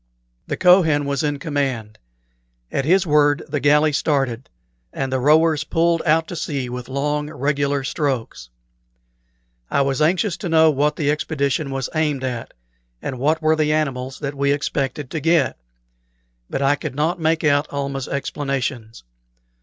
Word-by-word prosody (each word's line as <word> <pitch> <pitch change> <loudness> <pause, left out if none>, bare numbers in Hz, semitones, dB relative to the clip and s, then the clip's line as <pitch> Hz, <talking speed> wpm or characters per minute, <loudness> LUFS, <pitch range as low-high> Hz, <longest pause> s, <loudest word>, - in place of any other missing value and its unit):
The - - -3
Kohen 165 -5 +4
was 140 -1 -1
in 145 -1 -1
command. 135 -8 -3 0.7
At 135 - -1
his 185 +4 +3
word 145 -2 +3
the 145 -1 -2
galley 150 +2 +3
started, 135 -4 -1 0.4
and 135 -1 -3
the 130 - +1
rowers 155 +3 +3
pulled 165 +1 +1
out 160 +1 +3
to 175 - -5
sea 140 -6 -3
with 125 0 -6
long, 150 +2 -1
regular 140 -1 -1
strokes. 130 - -3 1.2
I - - +2
was 135 +1 0
anxious 180 +4 +2
to 175 - -5
know 160 -1 +5
what 150 +1 +1
the 145 -2 +1
expedition 145 -1 -1
was 135 -1 -3
aimed 150 -4 0
at, 125 -3 -4 0.4
and 130 - -5
what 155 +4 +1
were 155 0 +4
the 155 -1 +1
animals 135 -4 -2
that 140 -1 -3
we 140 0 +1
expected 140 -1 -2
to 160 - -2
get; 165 - +1 0.9
but 135 - -2
I 140 +1 +4
could 135 - -6
not 160 +5 0
make 160 0 +1
out 145 0 +2
Almah's 140 -2 -3
explanations. 135 -5 -3
145 Hz, 155 wpm, -21 LUFS, 135-155 Hz, 1.2 s, know